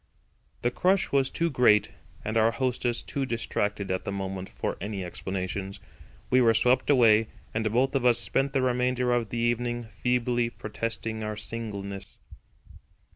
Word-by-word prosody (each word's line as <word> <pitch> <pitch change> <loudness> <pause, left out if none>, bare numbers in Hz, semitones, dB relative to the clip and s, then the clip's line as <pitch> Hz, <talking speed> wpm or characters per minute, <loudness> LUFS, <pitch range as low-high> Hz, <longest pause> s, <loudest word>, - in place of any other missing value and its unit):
The 120 - +2
crush 185 +7 +2
was 135 -1 +3
too 170 0 -1
great 120 -6 +4 0.3
and 110 - -2
our 110 0 +5
hostess 120 0 -1
too 140 - -3
distracted 105 -5 -2
at 95 - -1
the - - -3
moment 95 -1 -4
for - - -3
any 100 -2 -4
explanations. 95 +2 -4 0.5
We 130 0 +5
were 115 -2 +5
swept 125 +4 +3
away, 115 -5 +5 0.3
and 110 -1 0
both 130 +4 +2
of 135 -3 +1
us 120 -2 +5
spent 135 +3 0
the 135 -2 +2
remainder 125 0 +1
of 120 -3 0
the 120 - -4
evening 120 +1 0
feebly 120 +2 0
protesting 115 0 -4
our 105 -1 -3
singleness. 100 -3 -5
115 Hz, 155 wpm, -27 LUFS, 105-125 Hz, 0.5 s, our